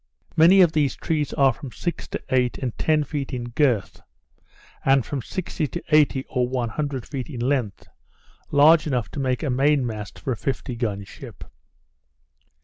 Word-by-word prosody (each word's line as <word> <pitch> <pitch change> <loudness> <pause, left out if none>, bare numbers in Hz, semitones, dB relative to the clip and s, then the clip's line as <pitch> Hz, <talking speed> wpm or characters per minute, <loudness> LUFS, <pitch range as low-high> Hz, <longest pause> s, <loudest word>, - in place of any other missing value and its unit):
Many 175 +5 +7
of 175 -3 +5
these 150 -4 +1
trees 150 -3 -2
are 135 -2 +4
from 135 0 -9
six 175 +5 -4
to - - -6
eight 125 -2 +1
and 125 -4 -4
ten 155 -1 +2
feet 140 -1 -4
in 120 -1 -5
girt, 120 -6 0 0.8
and 135 -2 +3
from 140 -3 -3
sixty 165 0 -3
to 175 - -6
eighty 150 -4 +3
or 125 -2 0
one 125 -2 -2
hundred 140 0 -3
feet 135 -2 -6
in 130 -6 -6
length, 125 -5 -1 0.6
large 155 +2 +5
enough 125 -6 -1
to - - -5
make 130 0 -1
a 145 - 0
main 135 +1 +2
mast 105 -3 -6
for 135 - -4
a - - 0
fifty 130 -1 -3
gun 105 -4 -2
ship. - - -11
135 Hz, 175 wpm, -23 LUFS, 125-150 Hz, 0.8 s, Many